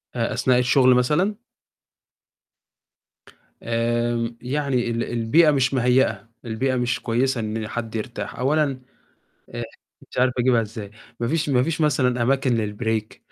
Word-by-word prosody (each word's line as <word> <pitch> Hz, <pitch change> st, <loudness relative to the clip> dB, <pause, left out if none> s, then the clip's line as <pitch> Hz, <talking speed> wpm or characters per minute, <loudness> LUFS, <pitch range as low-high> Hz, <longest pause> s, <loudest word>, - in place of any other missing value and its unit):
أ 115 Hz, -1 st, -1 dB
أثناء 125 Hz, -1 st, +2 dB
الشغل 130 Hz, 0 st, +4 dB
مثلًا؟ 170 Hz, +12 st, +1 dB, 2.3 s
آمم. 120 Hz, 0 st, -1 dB
يعني 130 Hz, -2 st, -1 dB
ال 115 Hz, 0 st, -1 dB
البيئة 120 Hz, +8 st, +3 dB
مش 135 Hz, -1 st, +1 dB
مهيّئة، 125 Hz, -1 st, +2 dB, 0.2 s
البيئة 130 Hz, +3 st, -1 dB
مش 125 Hz, -1 st, 0 dB
كويسة 125 Hz, +2 st, 0 dB
إن 110 Hz, 0 st, -3 dB
حد 115 Hz, -1 st, -5 dB
يرتاح. 110 Hz, +2 st, -5 dB
أولًا 140 Hz, 0 st, +1 dB, 0.7 s
أ -, -, -5 dB, 0.5 s
مش -, -, -10 dB
عارف 125 Hz, 0 st, +3 dB
أجيبها 125 Hz, -1 st, +3 dB
إزاي، 105 Hz, -2 st, -7 dB, 0.3 s
ما 120 Hz, -, -1 dB
فيش 155 Hz, +2 st, 0 dB
ما 125 Hz, -2 st, +3 dB
فيش 160 Hz, +2 st, -2 dB
مثلًا 130 Hz, -5 st, +2 dB
أماكن 130 Hz, 0 st, +2 dB, 0.2 s
للbreak 110 Hz, -2 st, -2 dB
125 Hz, 130 wpm, -23 LUFS, 115-135 Hz, 2.3 s, الشغل